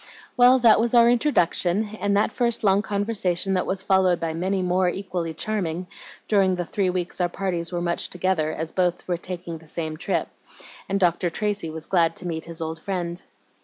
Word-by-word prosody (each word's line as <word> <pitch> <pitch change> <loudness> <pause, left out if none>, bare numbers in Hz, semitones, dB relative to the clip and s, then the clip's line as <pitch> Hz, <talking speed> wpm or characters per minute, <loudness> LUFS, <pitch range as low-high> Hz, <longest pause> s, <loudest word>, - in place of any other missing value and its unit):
Well, 250 +1 +6
that 235 -4 +5
was 235 +1 +1
our 235 0 +7
introduction, 215 - +1
and 200 +1 +1
that 210 - +2
first 235 -1 0
long 195 -1 +4
conversation 200 -3 -1
was 190 0 -2
followed 190 -2 +3
by 165 -1 -2
many 185 +3 -1
more 180 0 +2
equally 175 -3 -3
charming, 180 -3 -2 0.4
during 195 -3 +3
the 175 -1 -3
three 190 +1 0
weeks 180 0 -2
our 175 - +2
parties 175 -2 -3
were 175 -1 -2
much 170 0 0
together, 180 -3 0
as 160 +1 -4
both 180 -2 0
were 175 -1 0
taking 175 -2 -6
the 160 - -18
same 155 0 -4
trip, - - -1 0.6
and 195 +1 0
Dr. 175 -1 +2
Tracy 205 -1 -2
was 160 0 -7
glad 165 -3 +2
to 180 - -5
meet 160 -2 -4
his 165 0 -8
old 160 0 -4
friend. 175 -1 -4
180 Hz, 190 wpm, -24 LUFS, 170-200 Hz, 0.6 s, our